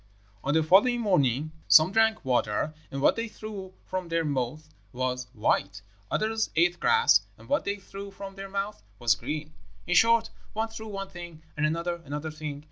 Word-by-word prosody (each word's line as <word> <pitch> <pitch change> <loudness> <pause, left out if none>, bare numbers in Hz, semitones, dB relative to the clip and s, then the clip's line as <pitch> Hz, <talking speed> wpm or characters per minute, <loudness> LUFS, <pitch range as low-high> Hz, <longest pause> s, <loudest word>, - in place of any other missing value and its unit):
"On 140 +3 +1
the 160 - +4
following 205 +9 +5
morning 155 - +2 0.2
some 160 +3 +7
drank 220 -2 +2
water, 125 +3 +1 0.2
and 135 0 -4
what - - +5
they 230 0 -2
threw 205 -4 -8
from 185 -1 -3
their 165 -1 0
mouths 145 +2 -2 0.2
was 125 0 -2
white; 100 -3 0 0.3
others 220 +1 0
ate 175 +2 +3
grass, 460 0 +5 0.2
and - - -15
what 290 - +1
they 200 - 0
threw 200 0 -9
from 195 0 -9
their 195 0 -8
mouths 200 +2 -3 0.2
was 120 -1 +3
green. 150 +7 -5 0.3
In 180 - 0
short, 230 +4 +5 0.2
one 220 +1 -1
threw 220 0 -8
one 195 -2 -5
thing, 175 -3 -10
and 150 0 +2
another 170 +2 -2
another 150 +2 -4
thing. 150 -2 -6
175 Hz, 180 wpm, -28 LUFS, 150-200 Hz, 0.3 s, some